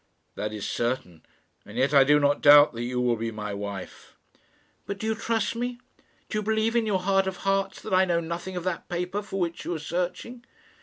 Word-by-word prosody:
"That 105 +1 -4
is 105 -2 -5
certain; 120 -10 -3 0.4
and 105 +3 -11
yet 135 +3 +2
I 140 -1 +8
do 150 +2 +4
not 145 0 +2
doubt 145 -1 +8
that 115 - -5
you 125 +1 -2
will 120 -1 +1
be 115 +1 -2
my 105 -2 -5
wife." 100 -1 -7 0.7
"But 200 - -4
do 220 - -5
you 220 - +1
trust 225 -1 -1
me? 245 +1 -3 0.5
Do 215 - -2
you - - -2
believe 220 +2 0
in 230 -2 +2
your 190 -3 +1
heart 195 0 +2
of 190 -1 -3
hearts 195 0 0
that 215 - -5
I 185 +1 +5
know 170 -2 +1
nothing 170 +3 -5
of 180 - -3
that 185 -2 -3
paper 180 +3 -2
for 195 -1 -5
which 170 -2 -2
you 175 - -3
are - - -2
searching?" 180 +9 -4
175 Hz, 220 wpm, -26 LUFS, 125-195 Hz, 0.7 s, I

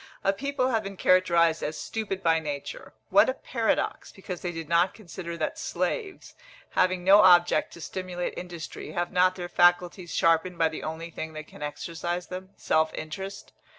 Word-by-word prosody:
A 195 - +3
people 270 +3 -1
have 225 -3 +1
been 195 -2 -7
characterised 170 -3 +3
as 155 +1 -3
stupid 195 -4 -4
by 165 -1 +4
nature; 145 -3 -6 0.2
what - - +6
a - - -1
paradox! - - -1
because 185 -2 -7
they 175 - -3
did 165 -2 -6
not 170 +3 +2
consider 170 -4 -7
that 155 - -3
slaves, 405 -6 -3 0.4
having 185 -1 +2
no 195 +3 +7
object 175 -2 +5
to 170 - -11
stimulate 180 +1 -4
industry, 175 -3 -7
have 175 0 -2
not 185 0 +3
their 175 -1 -5
faculties 175 0 +2
sharpened 165 +2 +2
by 165 -1 +3
the 160 - -6
only 160 +2 -5
thing 160 0 -6
that 155 0 -7
can - - -15
exercise 170 +4 -4
them, 185 +1 -7
self 160 0 +2
interest. 190 +6 -7
175 Hz, 175 wpm, -27 LUFS, 165-190 Hz, 0.4 s, no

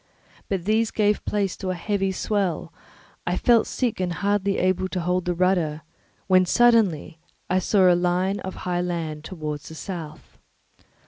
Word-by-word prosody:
But 190 -3 -2
these 220 +2 +2
gave 210 -1 +1
place 200 -3 -1
to 190 - -4
a 185 - -1
heavy 195 +2 -1
swell; 190 -5 -2 0.5
I 180 +1 0
felt 235 -2 +4
sick 245 -6 -2
and 180 -2 -1
hardly 200 +1 0
able 185 0 +1
to 185 - -3
hold 180 +1 0
the 175 0 -1
rudder, 170 -4 +1 0.4
when 185 -1 +5
suddenly 210 -9 +3 0.3
I 185 - +3
saw 195 +2 +2
a 180 - +6
line 180 +3 +1
of 190 - -6
high 175 -1 0
land 165 -4 -3
towards 155 -4 -6
the 160 - -10
south. 160 -4 -8
185 Hz, 165 wpm, -24 LUFS, 175-200 Hz, 0.5 s, a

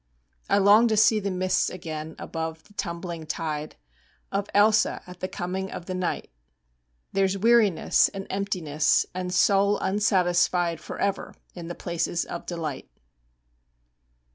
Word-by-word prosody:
I - - +4
long 205 +4 +6
to 220 -1 +1
see 215 +1 +5
the 200 -1 -2
mists 185 0 +1
again 160 -3 -6
Above 160 -1 -5
the 205 - -22
tumbling 170 -3 -5
tide 155 -1 -4 0.6
Of 200 0 -1
Ailsa, 215 +1 +3
at 180 0 -12
the 185 - -3
coming 190 +1 -4
of 175 - -7
the 185 - -4
night. 185 -1 -3 0.8
There's 195 0 +1
weariness 215 -4 +4
and 195 -1 -7
emptiness 175 -7 +1
And 180 0 -4
soul 200 +2 +3
unsatisfied 180 -4 +1
Forever 200 +4 -3 0.2
in 170 -2 -8
the 175 - -6
places 170 0 -2
of 170 - -7
delight. 160 -5 -5
185 Hz, 135 wpm, -26 LUFS, 170-200 Hz, 0.8 s, long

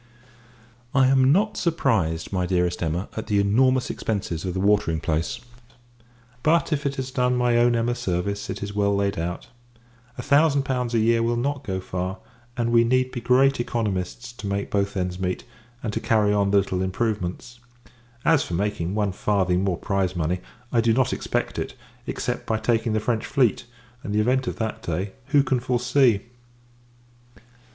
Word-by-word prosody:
I 135 -1 +6
am 130 0 +4
not 210 +6 +2
surprised, 110 - 0
my 90 -1 0
dearest 90 -1 0
Emma, 85 +3 -1
at 110 - -5
the 100 -1 +2
enormous 125 +6 +3
expences 95 -7 -3
of 90 -1 -3
the - - -1
watering 100 -5 +2
place; 80 +1 -1 1.0
but, 160 +1 +2
if 145 -1 -1
it 140 - -3
has 130 -1 -4
done 125 -1 +1
my 125 -1 +2
own 120 0 +4
Emma 115 +1 +1
service, 100 -3 -2
it 95 +1 -4
is 100 0 -5
well 100 -1 +1
laid 100 -1 0
out. 85 +2 -4 0.7
A 125 - -5
thousand 145 0 +4
pounds 125 -3 -1
a - - +4
year 115 +1 +3
will 120 +1 +1
not 140 +3 -2
go 95 -4 -3
far; 95 +1 -4 0.4
and 115 -1 0
we 115 0 +5
need 130 +2 +1
be 120 - -5
great 135 +2 +3
economists, 115 0 -3
to 120 -4 -7
make 100 0 -2
both 100 0 0
ends 90 0 -2
meet, 90 -1 -2 0.4
and 110 - -3
to - - -1
carry 105 -2 +2
on 100 -1 +2
the 100 - +4
little 95 -2 0
improvements. 105 +3 -3 0.7
As 160 -4 +5
for 85 - -3
making 100 -1 -1
one 105 -2 +1
farthing 95 -1 +1
more 95 -3 0
prize 95 -2 -1
money, 85 +2 -1 0.3
I 115 - +3
do 115 0 +3
not 130 +1 +2
expect - - -2
it; - - -4 0.3
except, - - -3
by 110 - +1
taking 115 0 0
the 110 - +2
French 110 +1 -1
fleet: 125 -7 +1 0.4
and, 105 - -4
the - - +3
event 130 +3 +1
of - - -2
that 110 -1 -3
day, 90 +4 -3 0.2
who 140 0 +4
can 130 -2 +1
foresee! 125 -2 +2
110 Hz, 180 wpm, -24 LUFS, 95-125 Hz, 1.0 s, I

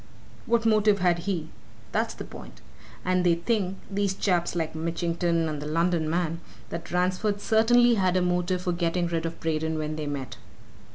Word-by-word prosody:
'What 230 0 +2
motive 215 -2 +4
had 175 -2 +2
he? 170 -3 -3 0.4
that's - - 0
the - - -6
point. - - -11 0.5
And 185 0 +2
they 175 -1 +4
think 195 +1 -1
these 200 -1 -1
chaps 175 -3 0
like 160 -2 -1
Mitchington 170 +1 0
and 150 -2 -4
the 150 - -5
London 165 0 +1
man 165 0 -1 0.3
that 170 0 -5
Ransford 185 +3 0
certainly 240 +3 +4
had 185 -4 +2
a - - +2
motive 180 +1 0
for 180 - 0
getting 175 0 0
rid 165 -1 -1
of 165 - -7
Braden 160 0 -1
when 155 0 -3
they 150 -1 -3
met." 140 -3 -5
175 Hz, 175 wpm, -26 LUFS, 165-190 Hz, 0.5 s, motive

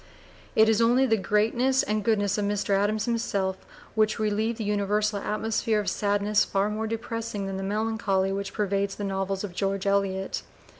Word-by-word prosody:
It 220 0 +6
is 220 0 +3
only 245 +3 +4
the 225 -3 +3
greatness 225 +6 +2
and 215 0 -1
goodness 205 -3 +1
of 205 - 0
Mr. 205 0 -1
Adams 205 +2 +1
himself 200 -5 -1 0.4
which 215 -1 +2
relieve 215 +2 0
the 225 - -3
universal 210 0 0
atmosphere 215 +1 0
of 205 - -1
sadness 205 0 +2
far 200 +2 0
more 220 +1 -2
depressing 225 -2 -4
than 195 0 -4
the - - -4
melancholy 205 -1 0
which 200 0 -3
pervades 200 -1 -1
the 205 - -5
novels 195 0 -2
of 200 -4 -5
George 195 +1 -1
Eliot. 195 -1 0
210 Hz, 170 wpm, -26 LUFS, 200-220 Hz, 0.4 s, It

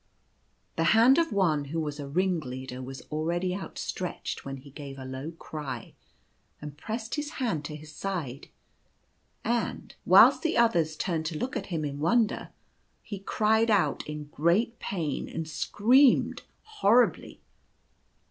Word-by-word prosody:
The 165 - +2
hand 255 +6 +7
of 330 -1 +1
one 160 -7 +2
who 160 +4 -3
was 150 -2 -3
a 140 - -5
ringleader 135 -7 -2
was 130 +1 -7
already 170 +4 -1
outstretched, 185 -2 -5
when 135 0 -6
he 140 +2 -14
gave 140 -1 -8
a 130 - -8
low 130 +3 -5
cry, 145 -7 -7 0.7
and 150 -1 -8
pressed 220 +8 -5
his 295 +1 -3
hand 220 - -1
to 150 - -5
his 155 0 -11
side; 155 -7 -4 1.0
and, 235 0 -2
whilst - - +7
the 325 - 0
others 170 -10 +3
turned 160 -2 -2
to 160 -1 -4
look 255 +11 -3
at 205 -5 -3
him 160 -5 -2
in 140 0 -4
wonder, 225 +7 +1 0.5
he 205 -3 -6
cried 220 +3 +2
out 205 -4 +2
in 150 0 -5
great 200 +9 +1
pain, 165 -7 -3
and 165 -1 -4
screamed 240 - +3 0.2
horribly. 250 - +2
165 Hz, 145 wpm, -28 LUFS, 150-220 Hz, 1.0 s, hand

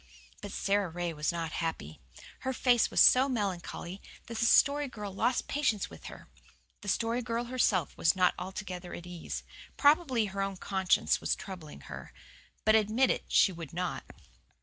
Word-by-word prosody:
But 205 -1 -7
Sara 200 -1 0
Ray 175 0 -3
was 150 0 -1
not 165 -2 -3
happy. 160 - -4 0.4
Her 260 0 -2
face 245 -2 +3
was - - 0
so 260 +2 +7
melancholy 195 -4 -3 0.2
that 230 -1 -6
the 235 - +3
Story 285 +3 +4
Girl 210 -6 -7
lost 245 +5 0
patience 260 -9 0
with - - -13
her. - - -10 0.5
The 205 - -10
Story 230 +4 0
Girl 235 0 -2
herself 235 - +1
was 165 - +3
not 185 -1 +3
altogether 185 -1 -6
at 175 - -9
ease. 175 -2 -6 0.3
Probably 285 -6 +4
her 195 0 -4
own 195 -1 -2
conscience 190 -1 +1
was - - +1
troubling 180 -6 -9
her. - - -9 0.5
But 215 - +5
admit 220 +4 +3
it - - -3
she 195 - +4
would 165 -4 -9
not. 180 +2 -3
200 Hz, 170 wpm, -30 LUFS, 180-240 Hz, 0.5 s, so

